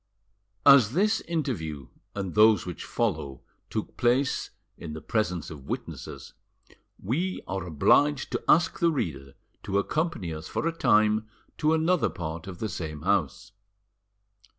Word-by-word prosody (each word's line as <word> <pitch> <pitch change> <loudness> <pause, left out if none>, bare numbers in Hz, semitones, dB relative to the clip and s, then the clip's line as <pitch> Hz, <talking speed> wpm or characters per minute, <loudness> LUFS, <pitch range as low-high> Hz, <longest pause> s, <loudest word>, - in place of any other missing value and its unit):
As 130 -5 +7
this 210 +6 +2
interview 100 - -3 0.3
and 95 -3 -3
those 105 -3 +5
which 90 -2 -6
follow 70 -2 -2 0.3
took - - -4
place 125 +3 +1 0.3
in 80 -2 -8
the 80 - -6
presence 90 -5 -2
of 70 -4 -10
witnesses, - - -6 0.6
we 170 - -2
are 95 -1 -3
obliged 135 - +3
to - - -2
ask 170 +3 +4
the 170 - +4
reader 70 - -4 0.3
to 100 -1 -1
accompany 150 - -1
us 80 0 -7
for - - -3
a - - +1
time 110 -7 +3 0.3
to 155 +1 +3
another 165 +2 +2
part 80 0 -6
of 90 -2 -7
the 110 - -3
same 75 -6 -6
house. 95 -3 0
105 Hz, 140 wpm, -27 LUFS, -, 0.6 s, As